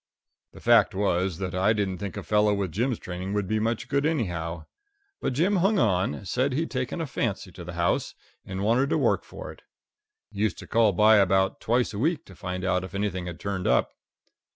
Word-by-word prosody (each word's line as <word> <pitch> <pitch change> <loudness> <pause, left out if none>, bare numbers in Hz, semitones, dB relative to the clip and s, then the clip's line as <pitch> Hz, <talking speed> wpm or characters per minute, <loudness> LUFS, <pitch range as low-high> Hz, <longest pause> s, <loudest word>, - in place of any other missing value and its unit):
The - - -12
fact - - +4
was 95 -3 0
that 95 -1 -4
I 95 +4 +3
didn't 100 -4 -2
think 100 -3 -5
a - - -5
fellow 105 -1 +3
with 100 -3 -2
Jim's 120 +6 0
training 90 +2 -5
would 100 -2 -1
be 110 +2 0
much 115 +1 -1
good, 140 0 +1
anyhow. 85 - -2 0.5
But - - -1
Jim 180 +9 +2
hung 195 +4 +3
on 95 - +1
said 130 +8 0
he'd 160 +5 -1
taken 130 +5 -2
a 165 - -1
fancy 100 -8 -3
to 90 0 -10
the 90 +1 -7
house, 85 0 0 0.3
and 95 +1 -5
wanted 120 +6 +2
to - - +2
work - - +2
for - - -9
it. - - -16 0.7
Used 105 -2 -1
to - - -9
call 115 -2 +3
by 105 +3 +5
about 95 -1 +2
twice 120 0 +1
a 100 - -4
week 160 +4 0
to 95 - -14
find 90 +1 -4
out 90 -1 +1
if 95 - -8
anything 95 -3 -2
had 85 -1 -7
turned 100 -2 -3
up. - - +2
100 Hz, 210 wpm, -26 LUFS, 90-120 Hz, 0.7 s, by